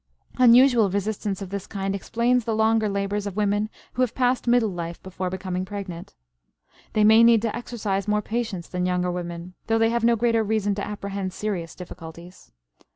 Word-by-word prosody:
Unusual 245 -3 +6
resistance 200 0 -2
of 190 - -9
this 200 -1 -5
kind 195 -1 -3
explains 235 +5 +1
the 225 0 -1
longer 220 0 +2
labors 200 +1 -2
of 195 - -6
women 210 0 0 0.2
who 255 - -2
have 245 -3 0
passed 250 -1 +1
middle 240 -3 +3
life 170 -1 -5
before 185 -1 -4
becoming 185 0 -3
pregnant. 185 -3 -7 0.8
They 215 - +3
may 220 +2 +7
need 230 -2 +5
to 225 -2 -1
exercise 215 -5 -3
more 210 0 +1
patience 220 -6 -3
than 180 0 -2
younger 180 0 0
women, 175 0 -6
though 225 - +2
they 225 0 +3
have 235 0 0
no 235 0 +4
greater 230 0 +2
reason 210 -1 0
to 200 - -4
apprehend 200 -2 -4
serious 185 -6 -4
difficulties. 170 - -11
205 Hz, 180 wpm, -24 LUFS, 185-225 Hz, 0.8 s, may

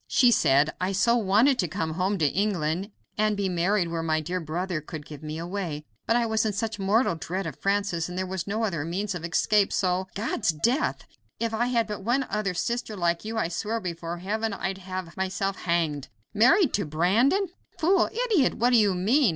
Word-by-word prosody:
She 245 -2 +5
said: 145 - +4
"I 185 +2 0
so 235 +5 +3
wanted 235 +5 +3
to 180 - +2
come 160 0 -3
home 190 +4 0
to 160 - +1
England 185 +1 0 0.3
and 215 -1 +2
be 200 -1 0
married 180 +1 +1
where 165 -1 -2
my 160 -1 +1
dear 175 +4 -3
brother 170 +1 -3
could 155 0 -8
give 150 -2 -10
me 155 0 -5
away, 170 -3 -4 0.2
but 230 - +3
I 240 -1 +3
was 220 -1 +1
in 215 -2 0
such 220 0 -3
mortal 205 +3 +2
dread 185 +3 -4
of 160 -5 -6
Francis, 195 -4 0
and 180 - -6
there 185 - -1
was 185 -1 -4
no 215 +3 -1
other 170 -9 -1
means 190 +5 -2
of 175 -2 -6
escape, 195 +4 +2
so 185 0 0
" - - -30
"God's 215 0 -1
death! 240 - 0 0.3
If 230 -1 -1
I 235 +2 +1
had 235 -2 +1
but 210 -1 -5
one 245 +6 +1
other 205 -3 -1
sister 235 +2 -2
like 170 -1 0
you, 220 +1 -4
I 220 - +1
swear 215 +6 -2
before 170 -3 -5
heaven 215 +4 -2
I'd 190 -1 -3
have 185 -2 -6
myself 190 +1 -1
hanged. 165 -6 -1 0.3
Married 260 - +4
to 200 - 0
Brandon? 220 - +2 0.3
Fool! 365 +5 +3 0.2
idiot! 385 - +2
what 245 +2 +2
do 245 - +6
you 205 -4 +3
mean? 225 +8 +3
195 Hz, 210 wpm, -26 LUFS, 170-220 Hz, 0.3 s, do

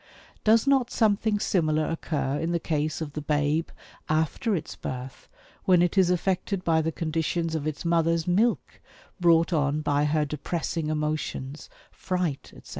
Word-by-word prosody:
Does 220 +2 +4
not 270 -3 +3
something 215 -2 +2
similar 155 -6 +1
occur 145 -4 -2
in 165 +1 -1
the 170 - +1
case 155 0 -2
of 150 -3 -5
the 150 - -4
babe, 150 +2 0 0.4
after 160 - +1
its 160 -2 -5
birth, 130 0 -7 0.4
when 180 -2 +5
it 175 - 0
is 190 -3 +4
affected 185 +1 0
by 160 -2 +3
the 160 +1 -1
conditions 165 +1 -2
of 155 -2 -2
its 155 +2 -4
mother's 165 0 +2
milk 215 +7 +1 0.4
brought 170 0 +4
on 150 -1 +1
by 145 -1 +1
her 150 0 +1
depressing 155 +2 -3
emotions, 150 -2 -3 0.2
fright, 180 -6 -2
etc.? - - -14
160 Hz, 155 wpm, -26 LUFS, 150-180 Hz, 0.4 s, when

